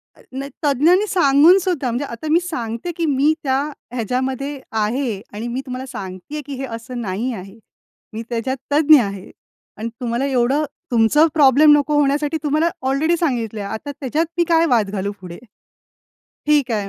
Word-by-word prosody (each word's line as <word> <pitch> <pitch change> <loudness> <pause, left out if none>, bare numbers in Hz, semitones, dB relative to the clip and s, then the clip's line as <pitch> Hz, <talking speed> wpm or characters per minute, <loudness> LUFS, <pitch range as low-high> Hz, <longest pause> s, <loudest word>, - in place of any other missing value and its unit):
अ, - - -20
नाही, 275 +2 -6
तज्ञांनी 310 +8 +3
सांगून 320 0 +5
सुद्धा, 350 -9 -1
म्हणजे 250 +5 -2
आता 235 +3 -7
मी 330 - +5
सांगते, 240 -2 -4
की 335 - 0
मी 290 +1 +3
त्या 265 -1 +1 0.3
ह्याच्यामध्ये 260 +4 -2
आहे 220 0 -1
आणि 215 +3 -5
मी 245 +2 -3
तुम्हाला 255 0 -5
सांगते 190 +1 -8
आहे, 305 - -3
की 285 - -7
हे 270 - -4
असं 240 +2 -7
नाही 215 +4 -2
आहे. 195 0 -9 0.6
मी 220 - -4
त्याच्यात 245 +3 -2
तज्ञ 305 0 +6
आहे 200 -3 -6 0.5
आणि 220 +2 -4
तुम्हाला 240 +2 -1
एवढं 265 +2 +1 0.3
तुमचं 240 +7 +4
प्रॉब्लेम 295 0 +6
नको 295 +1 0
होण्यासाठी 290 +2 +1
तुम्हाला 310 +3 +2 0.2
ऑलरेडी 300 +6 +2
सांगितलं 235 - -1
आहे. 200 - -5
आता 255 +6 -5
त्याच्यात 295 +4 0
मी 345 - +4
काय 330 0 +4
वाद 225 -5 +2
घालू 200 0 -2
पुढे, 175 -2 -9 1.1
"ठीक 295 -4 +3
आहे", 205 -3 -2
265 Hz, 170 wpm, -20 LUFS, 230-295 Hz, 1.1 s, तज्ञ